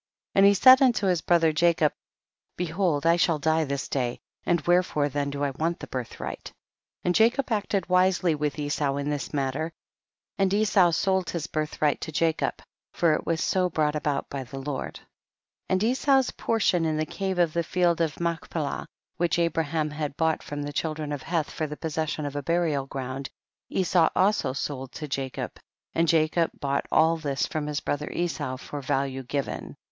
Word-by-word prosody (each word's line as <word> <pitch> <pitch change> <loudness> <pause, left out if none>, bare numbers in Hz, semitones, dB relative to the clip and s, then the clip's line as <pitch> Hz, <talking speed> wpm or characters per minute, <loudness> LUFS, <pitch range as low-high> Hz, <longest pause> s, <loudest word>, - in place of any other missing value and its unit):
12. - - +2
And 200 - +8
he 200 - +6
said 260 +6 +8
unto 240 -6 +3
his 180 -3 +2
brother 165 -2 +3
Jacob, 165 -1 +3 0.6
behold 170 -3 0
I 170 +1 +5
shall 165 -2 +2
die 160 +2 +1
this 140 -1 -3
day, 125 -3 -2 0.3
and 175 - +3
wherefore 175 -5 +2
then 140 +1 -1
do 140 0 -3
I 140 - +1
want 165 +5 -2
the - - -6
birthright? 125 -3 -6 0.5
And 180 - +2
Jacob 235 +6 +3
acted 205 -3 0
wisely 185 -1 +3
with 150 -1 -2
Esau 145 -1 -1
in 140 +1 -2
this 145 -2 -3
matter, 145 +3 -1 0.7
and 195 -1 +3
Esau 200 -3 +4
sold 190 +1 +1
his 165 -3 -3
birthright 155 -2 -1
to - - -5
Jacob, 160 +1 0 0.3
for 165 -3 +2
it - - -2
was 165 -1 0
so 185 -1 +1
brought 155 -2 0
about 145 -2 -1
by 140 -1 -5
the 130 +2 -9
Lord. 135 0 -4
13. - - -13 0.6
And 185 +1 +2
Esau's 265 +2 +3
portion 205 -6 +1
in 155 -1 0
the 155 - 0
cave 190 +3 -3
of 170 -3 +2
the 170 - +1
field 170 0 +1
of 155 -4 -1
Machpelah, 165 -3 -3 0.3
which 175 -1 +1
Abraham 165 -2 0
had 150 -1 -4
bought 160 -1 +1
from 145 0 -5
the 145 0 -5
chil 155 +1 -1
dren 150 -1 -5
of 145 -2 -3
Heth 165 -2 -1
for 155 - -2
the 150 0 -7
possession 155 -1 -2
of 145 0 -5
a 145 - -1
burial 155 -3 0
ground, 135 0 -5 0.4
Esau 175 -2 +3
also 190 -8 +2
sold 135 -2 -4
to 155 - -6
Ja 135 - -3
cob, - - -5 0.4
and 165 0 +2
Jacob 160 +1 +3
bought 140 0 -1
all 165 +1 +4
this 140 -4 -1
from 155 -1 -3
his 150 0 -2
brother 150 +1 -2
Esau 135 -7 -2
for 145 +2 -7
value 135 -1 -1
given. 135 +2 -4
160 Hz, 190 wpm, -26 LUFS, 145-175 Hz, 0.7 s, And